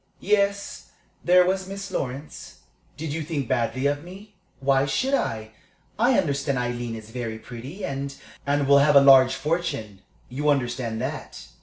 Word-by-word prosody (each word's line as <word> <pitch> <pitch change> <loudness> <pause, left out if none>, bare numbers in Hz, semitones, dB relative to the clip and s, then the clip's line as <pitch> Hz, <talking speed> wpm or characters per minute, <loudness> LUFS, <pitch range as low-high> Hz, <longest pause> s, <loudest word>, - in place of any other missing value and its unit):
"Yes, 200 0 0 0.3
there 180 +1 +5
was 190 +1 -1
Miss 195 0 -6
Lawrence." 135 +1 -6 0.4
"Did 155 -1 -4
you 165 - -3
think 150 -4 -3
badly 120 +4 -1
of 145 +1 0
me?" 195 +4 -12 0.3
"Why 135 0 +2
should 255 - 0
I? 110 - -1 0.5
I 240 +2 +4
understand 140 -5 0
Aileen 120 -1 -3
is 110 0 -10
very 115 -2 -4
pretty, 125 - -8
and 140 0 -4 0.2
" - - -23
"And 140 0 +1
will 140 0 +7
have 145 +1 +4
a - - +11
large 135 -1 +7
fortune. 135 - -3 0.3
You 145 +4 -1
understand 120 -4 -1
that?" 140 +1 -6
140 Hz, 160 wpm, -24 LUFS, 125-170 Hz, 0.5 s, a